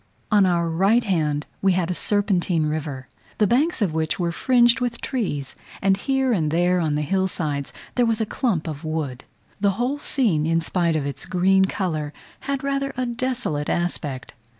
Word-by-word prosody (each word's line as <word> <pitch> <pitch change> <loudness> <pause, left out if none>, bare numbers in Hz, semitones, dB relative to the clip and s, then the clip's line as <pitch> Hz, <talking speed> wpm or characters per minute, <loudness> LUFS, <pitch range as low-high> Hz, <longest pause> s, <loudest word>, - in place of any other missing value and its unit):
On 205 -2 +5
our 170 -2 +1
right 195 +8 +3
hand 155 -7 0 0.2
we 195 -1 +4
had 180 -1 0
a - - +1
serpentine 185 -5 +1
river, 150 -4 -3 0.3
the 210 - +4
banks 260 - +2
of 175 -6 0
which 160 +2 -1
were 170 -1 0
fringed 240 +4 +4
with 245 -2 -2
trees, 180 - -3 0.2
and 195 0 +3
here 265 +4 +1
and 160 -7 +1
there 175 +3 +2
on 155 -3 0
the 150 - 0
hill 190 +5 +1
sides 145 -6 -3 0.2
there 245 -1 +2
was 225 -1 +1
a 220 - +1
clump 205 - -1
of 150 0 -5
wood. 155 -5 -3 0.3
The 200 -1 +2
whole 255 +5 -1
scene, 205 - +1
in 165 0 +2
spite 170 0 0
of 150 -3 -1
its 140 - -5
green 190 +1 +3
colour, 155 -7 -2 0.4
had 275 -1 -1
rather 275 0 -1
a 255 - 0
desolate 240 - -2
aspect. 150 -6 -2
180 Hz, 185 wpm, -23 LUFS, 155-230 Hz, 0.4 s, On